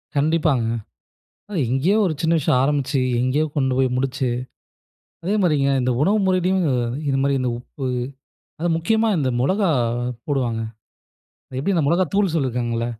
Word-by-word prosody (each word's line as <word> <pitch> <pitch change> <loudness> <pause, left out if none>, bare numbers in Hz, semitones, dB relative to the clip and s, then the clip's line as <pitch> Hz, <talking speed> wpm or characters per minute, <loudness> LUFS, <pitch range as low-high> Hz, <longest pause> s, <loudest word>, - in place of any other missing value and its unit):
கண்டிப்பாங்க. 150 -4 +2 0.8
அது 205 - -4
எங்கேயோ 145 - +2
ஒரு 170 - 0
சின்ன 165 0 +2
விஷயம் 130 -4 +2
ஆரம்பிச்சு, 140 -1 0 0.2
எங்கேயோ 130 +5 +1
கொண்டு 130 -3 +1
போய் 130 -1 +2
முடிச்சு. 130 0 -1 0.9
அதேமாரிங்க 175 -8 +2
இந்த 125 0 +1
உணவு 200 +8 +3
முறையிலும் 185 0 +2 0.4
இது 135 - +1
மாரி, 140 0 +2
இந்த 125 - 0
உப்பு 130 +2 -8 0.8
அது 175 - 0
முக்கியமா 220 +7 +1
இந்த 135 -4 0
மிளகாய் 125 - +1 0.2
போடுவாங்க. 125 -6 0 1.0
எப்டி 175 +9 0
இந்த 165 - +2
மிளகாய் 175 +1 +1
தூள் 195 -2 +2
சொல்லியிருக்காங்கள்ல. 120 -6 -1
145 Hz, 135 wpm, -22 LUFS, 130-175 Hz, 1.0 s, உணவு